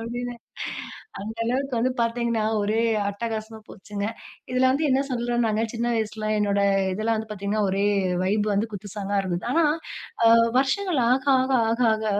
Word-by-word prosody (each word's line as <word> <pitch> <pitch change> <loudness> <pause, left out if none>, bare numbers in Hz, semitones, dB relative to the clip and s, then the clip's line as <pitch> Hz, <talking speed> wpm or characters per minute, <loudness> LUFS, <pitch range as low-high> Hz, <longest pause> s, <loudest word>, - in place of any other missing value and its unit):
அப்படின்னு 245 +1 -4 0.9
அந்த 220 +2 -6
அளவுக்கு 260 +2 -1
வந்து 255 +3 +2
பார்த்தீங்கன்னா, 230 -1 0 0.2
ஒரே 215 +2 +1 0.3
அட்டகாசமா 220 +1 -4
போச்சுங்க. 200 +1 -6 0.5
இதுல 255 +1 +2
வந்து 285 +4 +1
என்ன 265 - +3
சொல்றோனாங்க, 240 -3 0
சின்ன 235 0 -2
வயசுல, 215 -1 -2
என்னோட 200 -1 +1 0.3
இதெல்லாம் 220 +3 0
வந்து 220 0 -4
பார்த்தீங்கன்னா, 210 +1 -1
ஒரே 195 +1 0 0.4
வைப் 205 +3 +1
வந்து 205 +3 +1
குத்து 205 0 -7
சாங்கா 205 -1 -2
இருந்தது. 175 -2 -3
ஆனா, 330 +3 +3 0.6
அ - - +8 0.3
வருஷங்கள் 300 +4 +1
ஆக, 260 +1 +2 0.2
ஆக, 260 +1 0 0.2
ஆக, 235 +2 0
ஆக, 220 0 -4
225 Hz, 155 wpm, -24 LUFS, 210-245 Hz, 0.9 s, அ